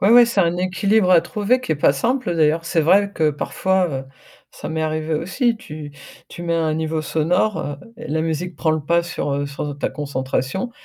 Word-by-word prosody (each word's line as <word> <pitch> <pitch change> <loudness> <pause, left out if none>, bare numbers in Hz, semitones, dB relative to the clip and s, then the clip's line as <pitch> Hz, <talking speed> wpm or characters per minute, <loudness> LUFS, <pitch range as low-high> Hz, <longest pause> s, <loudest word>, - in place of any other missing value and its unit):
Ouais 200 - +4
ouais, 240 0 +8
c'est 220 -4 +1
un 170 0 +1
équilibre 190 +2 +2
à 170 - +7
trouver 215 +8 0
qui 210 - -6
est - - 0
pas 140 - +4
simple 235 - -1
d'ailleurs. 160 +1 +2
C'est 165 -1 +1
vrai 200 +5 +3
que 155 -4 +2
parfois, 185 +5 0
heu, 135 -2 -4 0.5
ça - - -8
m'est 160 0 -2
arrivé 155 0 -1
aussi. 230 - 0
Tu 150 -6 -9 0.4
tu 175 - -9
mets 170 -1 -1
un 160 -1 +1
niveau 160 0 -2
sonore, 180 +7 +1
heu 145 0 -4 0.2
et - - -9
la 155 +2 0
musique 165 +2 -3
prend 160 -2 +1
le 155 - -1
pas 170 +2 +2
sur, 165 -4 -3
heu, 140 +1 -1
sur 145 0 -5
ta - - -1
concentration, 140 - -3
165 Hz, 215 wpm, -21 LUFS, 150-190 Hz, 0.5 s, ouais